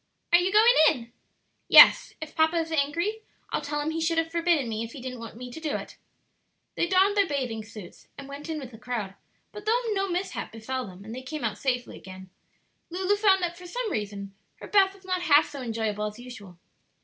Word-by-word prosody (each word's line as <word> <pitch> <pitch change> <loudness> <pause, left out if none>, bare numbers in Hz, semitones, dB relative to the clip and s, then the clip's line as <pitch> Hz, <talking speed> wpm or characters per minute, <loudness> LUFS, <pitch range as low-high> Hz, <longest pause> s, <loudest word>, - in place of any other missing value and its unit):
"Are 345 - +8
you 360 +2 0
going 440 +4 +6 0.2
in?" 235 -4 -5 0.5
"Yes; - - +8
if 315 -1 -8
papa 320 +1 +2
is 325 -1 -1
angry 335 +9 -1 0.3
I'll - - -1
tell 295 +1 -3
him 305 +2 -2
he 325 +1 -3
should 330 +1 0
have 325 0 0
forbidden 335 -5 +1
me 220 0 -3
if 230 - -8
he 280 - -8
didn't 255 -1 -7
want 230 -1 -9
me 250 0 -8
to 280 - -8
do 310 -2 -2
it." - - -7 0.8
They 345 - 0
donned 385 +3 +3
their 400 -2 +3
bathing 255 -7 -3
suits 215 -5 -12
and 280 - -9
went 285 +3 -9
in 320 - -2
with 260 -4 -9
the 225 - -13
crowd; 230 -6 -4 0.4
but 420 0 -10
though 470 +3 +3
no 390 -1 -1
mishap 360 +2 -3
befell 245 +2 -5
them 190 +1 -12
and 220 - -8
they 255 - -6
came 295 +2 -6
out 210 -2 -2
safely 250 -3 -2
again, 190 0 -12 0.6
Lulu 375 +3 0
found 395 -3 +3
that 345 -1 -2
for 360 - -10
some 465 +4 -3
reason 200 - -4 0.2
her - - -11
bath 390 -1 +3
was 385 -1 -20
not 370 -1 -1
half 310 -3 +5
so 280 -2 -7
enjoyable 220 -3 -2
as 210 +1 -8
usual. 210 -8 -11
290 Hz, 220 wpm, -26 LUFS, 230-355 Hz, 0.8 s, Are